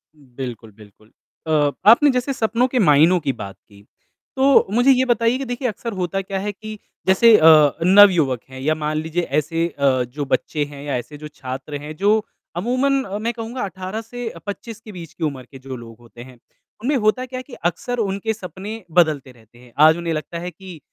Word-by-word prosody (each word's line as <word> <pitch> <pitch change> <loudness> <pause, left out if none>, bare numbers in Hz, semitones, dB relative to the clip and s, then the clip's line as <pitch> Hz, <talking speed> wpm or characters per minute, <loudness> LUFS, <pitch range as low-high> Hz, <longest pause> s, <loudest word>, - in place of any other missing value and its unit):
बिल्कुल, 125 -5 -9
बिल्कुल। 105 +1 -19 0.4
अ, 150 -2 +2 0.2
आपने 285 +6 +7
जैसे 255 +2 -1
सपनों 235 0 +1
के 255 -1 -1
मायनों 165 0 +5
की 140 -4 -2
बात 100 -4 -8
की, 100 -1 -18 0.5
तो 270 0 +4
मुझे 245 +4 +5
ये 260 0 +3
बताइए 235 0 +2
कि 275 - -5
देखिए 245 +1 -3
अक्सर 230 0 -5
होता 185 +1 -2
क्या 195 0 -4
है 205 +2 -3
कि 215 +1 -9 0.3
जैसे 215 +4 +6
अ, 155 -3 +7
नवयुवक 180 - +5
हैं 130 0 -10
या 155 +3 +1
मान 155 0 -2
लीजिए 160 +3 -2 0.2
ऐसे 165 +3 -1
अ, 135 -5 +1
जो 140 +4 -6
बच्चे 150 +2 -1
हैं 145 -1 -11
या 145 - -2
ऐसे 125 +5 -8
जो 150 +1 -8
छात्र 135 0 -7
हैं, 150 +1 -8
जो 210 +5 +2 0.3
अमूमन 255 +7 +1
अ, 200 -2 -5
मैं 230 +3 -2
कहूँगा 235 +2 -6
18 190 +3 -5
से 240 +1 -7
अ, - - -12
25 215 +2 -7
के 215 - -11
बीच 170 -4 -10
की 165 - -7
उम्र 140 -4 -3
के 135 - -11
जो 130 0 -8
लोग 115 -2 -11
होते 120 0 -13
हैं, 130 -1 -15 0.5
उनमें 285 +3 +1
होता 220 +3 +1
क्या 255 0 -6
है 255 - -8
कि 270 - -14
अक्सर 210 +8 -2
उनके 200 +1 -1
सपने 205 +2 -8
बदलते 155 -6 +2
रहते 120 0 -22
हैं। 125 -1 -18 0.2
आज 160 - +4
उन्हें 170 -1 -3
लगता 160 +2 -5
है 175 +1 -6
कि 180 -1 -12
175 Hz, 210 wpm, -21 LUFS, 145-225 Hz, 0.5 s, आपने